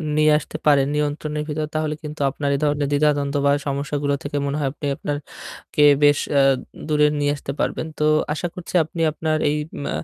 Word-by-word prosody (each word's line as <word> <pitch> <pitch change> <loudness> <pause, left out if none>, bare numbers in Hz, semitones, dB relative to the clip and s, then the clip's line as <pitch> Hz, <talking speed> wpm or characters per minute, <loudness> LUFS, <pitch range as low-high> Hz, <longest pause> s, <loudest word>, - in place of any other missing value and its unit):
নিয়ে 155 0 +4
আসতে - - -7
পারেন 140 -2 +5
নিয়ন্ত্রণের 150 0 -2
ভিতর 155 +1 -2
তাহলে 155 -1 -1
কিন্তু 150 0 -6
আপনার 140 +1 -3
এই - - -2
ধরনের 145 -1 +1
দ্বিধাদ্বন্দ্ব 145 -1 +1
বা 140 - +5 0.2
সমস্যাগুলো 140 +1 -1
থেকে 145 0 -3
মনে 140 +1 -2
হয় 135 -2 0
আপনি 150 - -7
আপনারকে 145 0 -6 0.6
বেশ, 145 0 +5 0.2
আ - - +6 0.5
দূরে 150 -1 +4
নিয়ে 145 0 +2
আসতে 140 -1 -6
পারবেন। - - -1
তো 150 - +1 0.3
আশা 165 +3 -2
করছি 180 0 -9
আপনি 165 +2 -8
আপনার 155 0 -1
এই, 150 - 0 0.3
মা - - -2
150 Hz, 185 wpm, -22 LUFS, 145-150 Hz, 0.6 s, আ